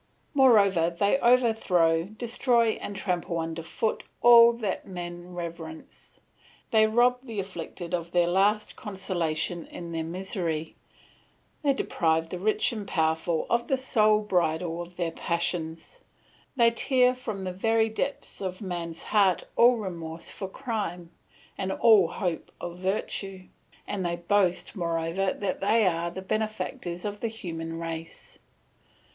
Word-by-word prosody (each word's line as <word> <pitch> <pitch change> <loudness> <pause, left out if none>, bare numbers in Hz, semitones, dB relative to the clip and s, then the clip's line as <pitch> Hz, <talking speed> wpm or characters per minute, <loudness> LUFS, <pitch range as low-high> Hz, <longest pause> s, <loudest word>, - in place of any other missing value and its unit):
Moreover, 200 - +5
they 200 +9 +1
overthrow, 220 -10 +3
destroy, 235 +2 +1
and 200 - -5
trample 180 -3 -2
under 165 0 -3
foot 215 +7 -2 0.2
all 235 -1 +9
that 215 -5 -3
men 175 -1 -7
reverence; 165 -2 -8 0.5
they 220 -1 +5
rob 245 +3 +3
the 230 -5 -6
afflicted 180 -2 -6
of 170 -1 -2
their 175 0 +3
last 200 +4 +2
consolation 175 -4 -3
in 170 -1 -8
their 165 -1 -2
misery; 170 -2 -3 0.9
they 285 - +3
deprive 165 -9 0
the 180 - -5
rich 215 +3 +1
and 210 -3 -6
powerful 160 -1 0
of 235 0 0
the 270 - +1
sole 215 -5 +3
bridle 170 -3 0
of 175 +1 -10
their 170 -2 -2
passions; 170 - -2 0.6
they 235 -2 +5
tear 250 +1 +3
from 220 -6 -6
the 185 -1 -3
very 225 +4 +2
depths 225 +3 -4
of 185 -1 -4
man's 170 -4 -5
heart 200 -4 +3
all 245 +1 +6
remorse 170 -6 -6
for 195 - -5
crime, 190 -7 -4 0.5
and 190 -1 -1
all 210 -3 +5
hope 175 -2 -3
of 175 0 -7
virtue; 190 0 -3 0.4
and 195 -2 -3
they 170 -1 -1
boast, 180 +2 +1
moreover, 170 +1 -1
that 200 -2 -3
they 215 +2 +3
are 170 -1 +1
the 190 +2 -7
benefactors 190 -4 -3
of 205 0 -4
the 230 - -1
human 165 -7 -6
race. 165 0 -7
185 Hz, 140 wpm, -27 LUFS, 170-220 Hz, 0.9 s, all